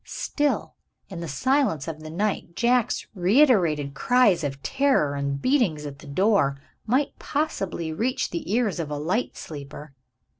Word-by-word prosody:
Still, 295 -1 -2 0.4
in 185 -4 -7
the 170 - -5
silence 250 - +1
of 160 -1 -5
the 155 0 -9
night, 180 0 -2
Jack's 240 -1 +1
reiterated 180 - +3
cries 205 - +3
of 140 -1 -4
terror 270 - +2
and 140 0 -2
beatings 200 - +1
at 140 -1 -7
the - - -13
door 140 -4 +2 0.3
might 260 +5 0
possibly 195 - -2
reach 240 +10 -1
the 170 +1 -4
ears 220 -5 +1
of 160 -3 -3
a 150 - -3
light 180 +12 -1
sleeper. 145 -1 -9
175 Hz, 150 wpm, -25 LUFS, 150-245 Hz, 0.4 s, reiterated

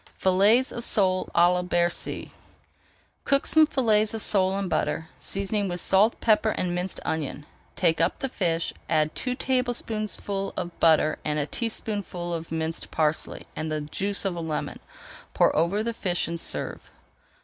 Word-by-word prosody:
FILLETS 205 +7 +4
OF 235 - -5
SOLE 185 -5 +1
À 175 +1 +5
LA 180 - 0
BERCY 175 -1 -1 0.9
Cook 275 -1 +2
some 315 -1 +5
fillets 220 -6 +2
of 220 - -4
sole 190 -1 +2
in 200 -1 -2
butter, 160 -2 -1
seasoning 200 +1 -2
with 175 -1 -3
salt, 200 +6 +3
pepper, 220 -1 +3
and 180 -4 -1
minced 180 +1 -3
onion. 150 -2 -3 0.3
Take 165 -2 +2
up 165 - +1
the 270 - -2
fish, 170 -9 -1 0.2
add 155 -1 +2
two 250 -1 -2
tablespoonfuls 220 -6 -2
of 175 - -5
butter, 155 -1 +4
a 150 -1 0
teaspoonful 200 -3 -4
of 165 -1 -5
minced 160 0 -3
parsley, 155 0 -1
and 155 0 -3
the 155 -1 -1
juice 195 +8 -2
of 190 -3 -1
a 170 - -4
lemon. 160 -2 -3 0.6
Pour - - +4
over 170 +7 +1
the 235 +1 -2
fish 180 -7 -1
and 170 0 -4
serve. - - -5
185 Hz, 160 wpm, -26 LUFS, 165-215 Hz, 0.9 s, À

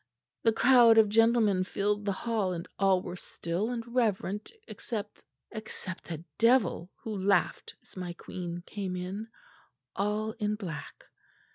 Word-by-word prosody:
The 225 - +4
crowd 235 0 +6
of 220 -2 +6
gentlemen 225 -3 +4
filled 205 +2 -1
the 200 - +1
hall 205 -2 -1
and 170 -1 -5
all 195 -2 +4
were 180 - -5
still 180 +3 -3
and 240 -2 -3
reverent 215 -4 -1 0.2
except 210 -3 -6 0.3
except 215 -5 -7
a 165 0 -6
devil 230 -7 +3
who 220 -2 -4
laughed 195 -1 +1
as - - -16
my 180 -2 -4
queen 175 0 -6
came 195 -3 -4
in, 190 +5 -4 0.7
all 210 +2 0
in 210 -1 0
black. 180 -8 -7
205 Hz, 140 wpm, -30 LUFS, 185-225 Hz, 0.7 s, crowd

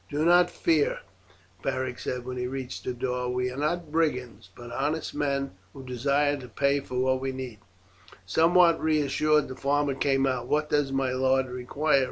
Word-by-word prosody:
"Do 150 +2 0
not 175 +1 +5
fear," 155 -3 +1 0.6
Beric 130 -1 -2
said 125 -1 -4
when 130 0 -5
he 125 0 -2
reached 130 -1 -5
the - - -1
door, 125 0 -2
"we 125 0 -1
are - - -8
not 155 +2 -1
brigands, 125 -11 -1
but 120 -1 -10
honest 150 +5 -2
men, 140 -1 -1 0.2
who 135 -1 -10
desire 140 +3 +1
to 130 -2 -9
pay 140 +2 +1
for 125 -2 -4
what 130 0 +1
we 135 0 -2
need." 130 -5 -7 0.7
Somewhat 170 - +4
reassured, 155 0 +2
the 130 - -7
farmer 140 +1 +1
came 135 0 +1
out. 130 -2 -1
"What 150 +2 0
does 145 -2 +2
my 135 -1 0
lord 130 +1 +2
require?" 140 +4 +1
135 Hz, 180 wpm, -27 LUFS, 125-150 Hz, 0.7 s, not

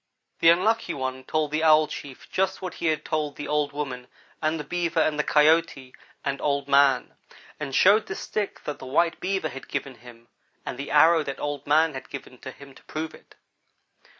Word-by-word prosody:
"The 165 - +6
Unlucky 210 +7 +2
one 130 -1 -4
told 155 0 -1
the 155 +1 0
Owl 155 -1 +6
chief 140 -3 -9
just 190 0 0
what 185 -1 -5
he 170 - -3
had 155 -1 0
told 155 -2 -2
the 145 - -6
old 150 -1 0
woman 135 -4 -5 0.3
and 155 +1 0
the - - -4
Beaver 170 +1 -1
and 155 -1 +1
the - - +3
Coyote 150 -4 +2 0.3
and 140 -1 -2
Old 140 -1 0
man, 140 -2 +3 0.4
and 135 - -4
showed 210 +3 +5
the 190 - -4
stick 205 0 -4
that 150 - -5
the 130 - -9
white 165 +5 +1
Beaver 190 -3 -1
had 135 -1 -9
given 135 - -4
him 120 -1 -16 0.4
and 125 - -5
the 140 - -5
arrow 160 +2 +5
that 140 -2 -5
Old 145 -1 -4
man 155 +2 +3
had 130 - -8
given 130 -2 -9
to 135 - -8
him 140 +1 -13
to - - -18
prove 155 +1 -5
it. - - -17
150 Hz, 205 wpm, -25 LUFS, 135-165 Hz, 0.4 s, The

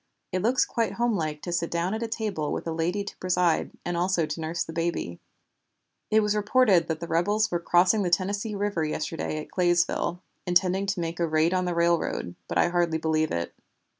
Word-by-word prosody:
It 185 - -1
looks 245 +5 +3
quite 230 -1 -1
homelike 165 -11 -1
to 175 - -4
sit 170 -1 -1
down 170 +3 -1
at 220 - -3
a 230 - -1
table 210 -9 -2
with - - -3
a 165 - -2
lady 170 +5 -1
to 200 - -9
preside, 180 -2 +1 0.2
and 175 - -2
also 175 -1 +1
to 155 +2 -5
nurse 160 +2 -2
the 165 - -9
baby. 165 - -2 0.9
It 220 0 +4
was 210 0 +1
reported 210 -5 +3
that 160 -1 -2
the 170 - -5
rebels 205 +7 +1
were 175 - 0
crossing 180 +5 +3
the 180 - 0
Tennessee 200 +4 0
River 200 -4 -1
yesterday 155 0 -3
at - - -9
Claysville, 175 0 +1 0.2
intending 185 +2 +2
to 195 -1 -1
make 165 +1 -4
a 170 - +1
raid 160 +2 +2
on 185 -1 +1
the 175 -1 -1
railroad, 170 - +1
but - - -2
I - - +4
hardly 170 -2 +1
believe 155 -1 +1
it." 85 0 -3
175 Hz, 205 wpm, -26 LUFS, 165-200 Hz, 0.9 s, It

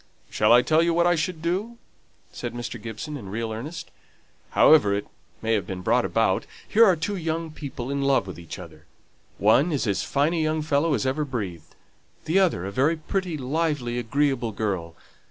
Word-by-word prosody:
"Shall 105 +1 +3
I 120 +1 +7
tell 160 +1 +3
you 170 0 +2
what 170 0 +3
I 175 - +4
should 165 0 -2
do?" 200 +8 -2 0.6
said - - -5
Mr. 120 -2 -5
Gibson, 115 +8 -6
in 100 -8 -9
real 110 +2 -3
earnest. 145 +10 -6 0.6
"However 105 -11 +5
it 100 - -3 0.4
may 115 0 +1
have 100 -5 0
been 95 -1 -5
brought 120 +5 +2
about, 115 -4 +1 0.2
here 225 +2 +5
are 185 - +5
two 185 +6 -3
young 165 -2 -3
people 140 -4 -6
in 140 0 -1
love 135 -6 +2
with 95 -2 -8
each 85 - -8
other. 80 -4 -12 0.5
One 125 - +4
is 145 -4 0
as 100 -3 0
fine 145 +4 +1
a 165 - 0
young 155 0 0
fellow 150 +1 +2
as 110 - -2
ever 135 +4 0
breathed; 100 - -6 0.5
the 170 +5 +3
other 170 - +1
a 100 - -4
very 145 +10 +2
pretty, 180 +1 -3
lively, 140 -3 -1
agreeable 125 -1 0
girl. 95 -6 -3
140 Hz, 190 wpm, -25 LUFS, 110-160 Hz, 0.6 s, I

